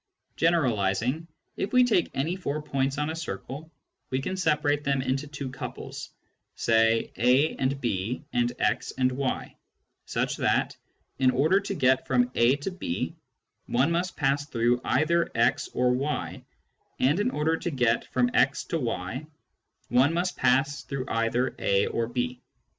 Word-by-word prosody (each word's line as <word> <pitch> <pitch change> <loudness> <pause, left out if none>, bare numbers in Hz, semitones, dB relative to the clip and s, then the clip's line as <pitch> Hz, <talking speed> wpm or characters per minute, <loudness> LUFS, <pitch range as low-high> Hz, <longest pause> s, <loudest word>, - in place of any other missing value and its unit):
Generalising, 130 - +1 0.3
if 195 - -3
we 250 0 +7
take 220 -8 +2
any 160 +7 0
four 155 -5 -3
points 140 -2 -1
on 150 +1 -1
a - - -4
circle, 160 -1 -6 0.4
we 130 - 0
can 160 +7 -3
separate 150 -4 +1
them 140 -2 +1
into 135 +3 -1
two 140 -2 -6
couples, 130 - -7 0.5
say 115 0 +2
a 125 +7 +3
and 135 +1 0
b 120 +3 -2
and 120 0 +2
x 115 +4 0
and 130 0 +2
y, 130 0 -3 0.5
such - - -1
that, - - +1 0.4
in 130 - +5
order 155 +9 +3
to 200 0 -4
get 130 -4 +2
from 125 -1 +2
a 120 +3 +4
to 145 +7 -4
b 125 - -3 0.5
one 130 +7 +2
must 175 +2 -1
pass 140 0 +1
through 120 -2 +1
either 170 +4 +2
x 115 - +2
or 125 0 +2
y, 140 +4 -2 0.6
and 145 +8 +3
in 210 - +2
order 160 -6 +1
to 175 - -3
get 120 -6 +1
from 125 -1 +2
x 135 - +3
to 165 - -2
y 115 +2 -3 0.6
one 130 +7 +3
must 175 +1 0
pass 135 +3 +2
through 135 -2 -5
either 115 +3 0
a 100 0 +2
or 115 -1 -1
b. 125 +1 -3
135 Hz, 160 wpm, -27 LUFS, 125-155 Hz, 0.6 s, we